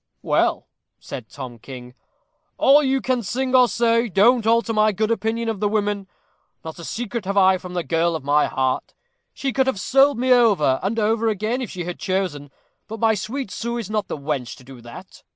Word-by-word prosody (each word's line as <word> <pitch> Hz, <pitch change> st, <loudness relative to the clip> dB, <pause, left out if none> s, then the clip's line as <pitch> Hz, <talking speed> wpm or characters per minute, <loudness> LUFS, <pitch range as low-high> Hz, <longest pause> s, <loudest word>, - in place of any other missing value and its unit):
"Well," -, -, +1 dB, 0.3 s
said 110 Hz, -5 st, -9 dB
Tom 125 Hz, 0 st, -9 dB
King, 125 Hz, 0 st, -10 dB, 0.6 s
"all 285 Hz, +2 st, +6 dB
you 270 Hz, -2 st, 0 dB
can 255 Hz, -1 st, 0 dB
sing 255 Hz, +5 st, -3 dB
or 250 Hz, -1 st, +6 dB
say 230 Hz, 0 st, +1 dB
don't 220 Hz, +4 st, +3 dB
alter 230 Hz, 0 st, +2 dB
my 215 Hz, 0 st, +3 dB
good 215 Hz, +3 st, -1 dB
opinion 230 Hz, +1 st, -1 dB
of 220 Hz, -3 st, -2 dB
the 205 Hz, -, 0 dB
women. 205 Hz, -2 st, -1 dB, 0.6 s
Not 160 Hz, +1 st, -8 dB
a -, -, -8 dB
secret 235 Hz, +4 st, -4 dB
have 200 Hz, +1 st, -2 dB
I 190 Hz, -1 st, +5 dB
from 180 Hz, 0 st, -9 dB
the 175 Hz, -, -1 dB
girl 165 Hz, 0 st, 0 dB
of 155 Hz, -, -5 dB
my 145 Hz, +2 st, +2 dB
heart. 130 Hz, -1 st, -2 dB, 0.4 s
She 270 Hz, -2 st, -3 dB
could 265 Hz, -1 st, +1 dB
have 260 Hz, -7 st, -1 dB
sold 275 Hz, +5 st, +3 dB
me 255 Hz, +1 st, +3 dB
over 200 Hz, -, +3 dB
and 205 Hz, +5 st, -2 dB
over 225 Hz, +1 st, +1 dB
again 220 Hz, +4 st, -1 dB
if 240 Hz, -, -5 dB
she 180 Hz, -, -5 dB
had 175 Hz, +1 st, -6 dB
chosen, 185 Hz, -8 st, -2 dB, 0.4 s
but 225 Hz, +1 st, -7 dB
my 225 Hz, 0 st, +3 dB
sweet 215 Hz, +3 st, -4 dB
Sue 235 Hz, +1 st, -4 dB
is 215 Hz, -3 st, -5 dB
not 210 Hz, -3 st, -1 dB
the -, -, -5 dB
wench 140 Hz, -4 st, -4 dB
to -, -, -16 dB
do 130 Hz, -1 st, -13 dB
that." 120 Hz, +11 st, -12 dB
210 Hz, 205 wpm, -22 LUFS, 170-235 Hz, 0.6 s, all